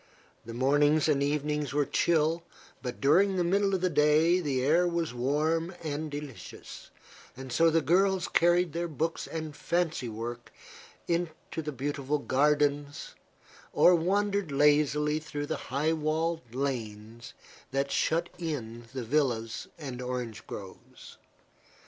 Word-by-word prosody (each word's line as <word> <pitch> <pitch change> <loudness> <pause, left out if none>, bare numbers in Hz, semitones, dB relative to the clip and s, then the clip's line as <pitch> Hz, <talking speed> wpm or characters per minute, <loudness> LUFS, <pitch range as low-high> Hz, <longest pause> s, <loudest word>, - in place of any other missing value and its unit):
The 115 - -6
mornings 145 +4 +3
and 145 -3 +2
evenings 150 0 -1
were 145 0 +2
chill, 165 +2 +1 0.4
but 125 -2 -5
during 190 +8 +4
the 180 - +1
middle 195 +2 +2
of 185 - -2
the 185 - +2
day 155 +4 +4
the 135 -7 -1
air 165 +6 +3
was 170 -5 -1
warm 155 +7 0
and 155 0 -3
delicious; 145 -8 -9 0.6
so 165 +7 +4
the 165 -1 +2
girls 185 +4 +2
carried 175 -1 +3
their 170 +1 -2
books 165 +1 -3
and 155 -2 -5
fancy 165 -8 -1
work 120 +2 -6 0.6
into 170 -1 -3
the 150 -1 -4
beautiful 140 +1 -2
gardens 145 +1 0 0.6
or 180 - +6
wandered 200 +1 +1
lazily 150 +1 +3
through 145 -2 -5
the - - -3
high 150 +5 +1
walled 160 -4 -2
lanes 115 -4 -4 0.3
that 140 +1 -1
shut 165 +2 +1
in 120 -8 -5
the 130 - -3
villas 115 -4 -1
and 130 -5 -6
orange 125 -3 -5
groves. 95 -2 -11
150 Hz, 130 wpm, -29 LUFS, 135-165 Hz, 0.6 s, or